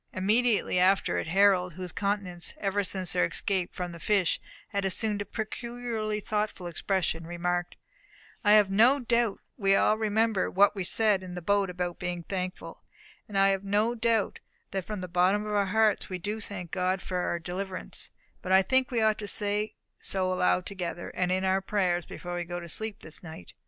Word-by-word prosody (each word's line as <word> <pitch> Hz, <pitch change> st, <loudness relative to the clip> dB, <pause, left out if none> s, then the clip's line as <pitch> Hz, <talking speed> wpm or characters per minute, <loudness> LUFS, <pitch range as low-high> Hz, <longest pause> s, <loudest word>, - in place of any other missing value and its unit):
Immediately 215 Hz, 0 st, +2 dB
after 190 Hz, +2 st, +3 dB
it, -, -, -4 dB
Harold, 185 Hz, 0 st, +3 dB
whose 180 Hz, +1 st, -7 dB
countenance 200 Hz, -4 st, -1 dB
ever 200 Hz, 0 st, 0 dB
since 185 Hz, -2 st, +1 dB
their -, -, +2 dB
escape 185 Hz, -, -1 dB
from 180 Hz, -1 st, -4 dB
the 170 Hz, -, -9 dB
fish 195 Hz, 0 st, +1 dB, 0.3 s
had 200 Hz, -2 st, -1 dB
assumed 205 Hz, +2 st, 0 dB
a -, -, -3 dB
peculiarly 225 Hz, -1 st, -4 dB
thoughtful 210 Hz, -3 st, -2 dB
expression, 170 Hz, -1 st, -1 dB
remarked: 175 Hz, 0 st, -2 dB, 0.7 s
"I 210 Hz, -1 st, +6 dB
have 210 Hz, -2 st, +5 dB
no 235 Hz, +8 st, +5 dB
doubt 235 Hz, -4 st, +1 dB, 0.2 s
we 195 Hz, -4 st, +3 dB
all 215 Hz, +2 st, +3 dB
remember 220 Hz, -2 st, +1 dB
what 200 Hz, +2 st, +4 dB
we 195 Hz, -, -2 dB
said 210 Hz, 0 st, +3 dB
in 180 Hz, -1 st, -8 dB
the -, -, -3 dB
boat 200 Hz, +1 st, +2 dB
about 180 Hz, -1 st, -3 dB
being 180 Hz, -2 st, -3 dB
thankful; 185 Hz, 0 st, -5 dB, 0.5 s
and 205 Hz, -, -4 dB
I 195 Hz, 0 st, +5 dB
have 195 Hz, 0 st, 0 dB
no 210 Hz, +4 st, +1 dB
doubt 230 Hz, -2 st, 0 dB, 0.3 s
that 190 Hz, -2 st, -3 dB
from 210 Hz, -3 st, -5 dB
the 180 Hz, -, -5 dB
bottom 185 Hz, +4 st, +2 dB
of 210 Hz, -, -3 dB
our 200 Hz, -1 st, +2 dB
hearts 215 Hz, +1 st, +2 dB
we 185 Hz, -, -3 dB
do 205 Hz, +5 st, -4 dB
thank 190 Hz, -5 st, -7 dB
God 185 Hz, 0 st, 0 dB
for 185 Hz, -1 st, -4 dB
our 175 Hz, -1 st, 0 dB
deliverance; 185 Hz, +2 st, -6 dB, 0.3 s
but 185 Hz, -, -4 dB
I 190 Hz, 0 st, +6 dB
think 260 Hz, +5 st, +2 dB
we 235 Hz, -3 st, 0 dB
ought 215 Hz, -1 st, +2 dB
to 205 Hz, -, -5 dB
say 210 Hz, +1 st, 0 dB, 0.2 s
so 185 Hz, -1 st, +1 dB
aloud 90 Hz, -, +2 dB
together, 175 Hz, -3 st, -5 dB
and 180 Hz, 0 st, 0 dB
in 185 Hz, +1 st, +1 dB
our 190 Hz, +1 st, +2 dB
prayers, 185 Hz, -3 st, 0 dB
before 175 Hz, 0 st, -7 dB
we 175 Hz, 0 st, -2 dB
go 175 Hz, +1 st, -5 dB
to 170 Hz, -, -8 dB
sleep 220 Hz, +5 st, -3 dB
this 155 Hz, -, -6 dB
night." 160 Hz, -, -10 dB
195 Hz, 195 wpm, -28 LUFS, 180-210 Hz, 0.7 s, I